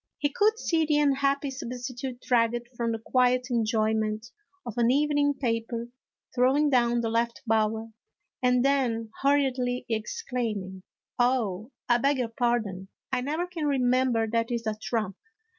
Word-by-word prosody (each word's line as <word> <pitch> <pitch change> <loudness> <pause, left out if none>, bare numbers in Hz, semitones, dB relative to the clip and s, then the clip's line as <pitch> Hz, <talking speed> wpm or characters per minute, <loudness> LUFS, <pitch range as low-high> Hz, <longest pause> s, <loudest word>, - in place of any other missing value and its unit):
He 290 - 0
could 430 +5 +3
see 330 -7 +1
the 300 -1 +2
unhappy 280 -1 +2
substitute 250 0 -6
dragged 240 0 +1
from 235 -1 -1
the 225 - -1
quiet 250 +2 +1
enjoyment 220 0 0 0.3
of 235 - -6
an 235 -1 +3
evening 290 +1 +2
paper, 230 -2 -2 0.4
throwing 270 +4 +3
down 240 -2 +3
the 225 - -1
left 235 +2 -1
bower, 220 0 0 0.5
and 250 0 +3
then 240 -5 +1
hurriedly 260 -3 +1
exclaiming: 220 - -3 0.2
" - - -39
Oh, 235 -4 +1 0.2
I 240 -1 +4
beg 280 +3 +2
your 245 -3 -1
pardon, 225 -5 -1 0.2
I 260 -1 0
never 310 +7 -1
can 340 -4 -3
remember 255 -3 +2
that 230 +1 0
is 235 -2 -2
a 220 - 0
trump." 215 -2 -3
245 Hz, 145 wpm, -27 LUFS, 225-270 Hz, 0.5 s, I